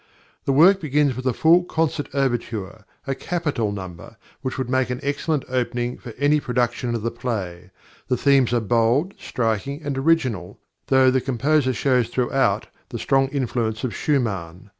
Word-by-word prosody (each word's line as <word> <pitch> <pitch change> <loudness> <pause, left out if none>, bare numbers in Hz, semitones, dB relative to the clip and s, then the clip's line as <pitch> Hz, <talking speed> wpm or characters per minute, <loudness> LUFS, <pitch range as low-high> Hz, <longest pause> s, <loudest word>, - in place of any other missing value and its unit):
The - - +1
work 180 +8 +6
begins 145 -3 +1
with 130 +1 -4
a - - +3
full 165 +7 +4
concert 160 -4 -1
overture, 115 -6 -2 0.2
a 135 - -1
capital 140 -9 -2
number, 95 +1 -8 0.2
which 130 -2 -4
would 130 -2 -2
make 130 -1 +1
an 125 0 -3
excellent 145 +1 -1
opening 125 -1 -2
for 120 - -9
any 145 +1 +3
production 120 -2 -1
of 115 - -4
the 115 - -1
play. 90 -7 -4 0.4
The 125 - +1
themes 135 -2 +3
are 120 -1 +2
bold, 120 - +2
striking, 125 - -2
and 140 -2 -2
original, 130 - 0 0.3
though 130 -1 +5
the 130 0 +1
composer 135 +2 +1
shows 125 -1 +1
throughout 130 +2 +1 0.2
the - - -5
strong 135 0 +2
influence 120 -5 -2
of 125 - -2
Schumann. 100 - -2
130 Hz, 160 wpm, -22 LUFS, 115-140 Hz, 0.4 s, work